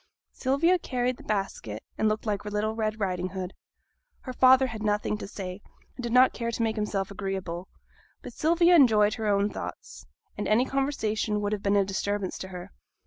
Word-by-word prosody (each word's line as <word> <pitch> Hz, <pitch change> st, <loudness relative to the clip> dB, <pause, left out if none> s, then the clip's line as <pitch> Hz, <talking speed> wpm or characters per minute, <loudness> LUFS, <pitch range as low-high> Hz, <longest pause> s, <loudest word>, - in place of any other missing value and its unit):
Sylvia 320 Hz, +8 st, +2 dB
carried 250 Hz, -4 st, -1 dB
the -, -, -13 dB
basket, 195 Hz, -, -3 dB
and 215 Hz, -, +2 dB
looked 215 Hz, +1 st, -2 dB
like 205 Hz, -2 st, -1 dB
little 210 Hz, +1 st, -1 dB
Red 220 Hz, -1 st, -2 dB
Riding 185 Hz, -2 st, -1 dB
Hood. 185 Hz, 0 st, -5 dB, 0.7 s
Her 255 Hz, -, -6 dB
father 260 Hz, +1 st, +6 dB
had 225 Hz, -4 st, -5 dB
nothing 210 Hz, 0 st, 0 dB
to -, -, -6 dB
say, 190 Hz, -1 st, -7 dB, 0.3 s
and -, -, -7 dB
did 240 Hz, -1 st, -3 dB
not 255 Hz, +2 st, +6 dB
care 235 Hz, -1 st, -3 dB
to 230 Hz, 0 st, -1 dB
make 220 Hz, -1 st, 0 dB
himself 205 Hz, -2 st, -2 dB
agreeable; 190 Hz, -3 st, -4 dB, 0.6 s
but -, -, -8 dB
Sylvia 340 Hz, +4 st, +4 dB
enjoyed 215 Hz, -8 st, +5 dB
her 220 Hz, -2 st, -3 dB
own 200 Hz, 0 st, +2 dB
thoughts, -, -, -8 dB, 0.3 s
and -, -, -3 dB
any 225 Hz, +4 st, +3 dB
conversation 225 Hz, -7 st, -1 dB
would 205 Hz, 0 st, -1 dB
have 205 Hz, -, -3 dB
been 200 Hz, 0 st, +1 dB
a 200 Hz, -1 st, +4 dB
disturbance 200 Hz, 0 st, -2 dB
to 190 Hz, -, -6 dB
her. 180 Hz, +1 st, -9 dB
215 Hz, 190 wpm, -27 LUFS, 195-245 Hz, 0.7 s, father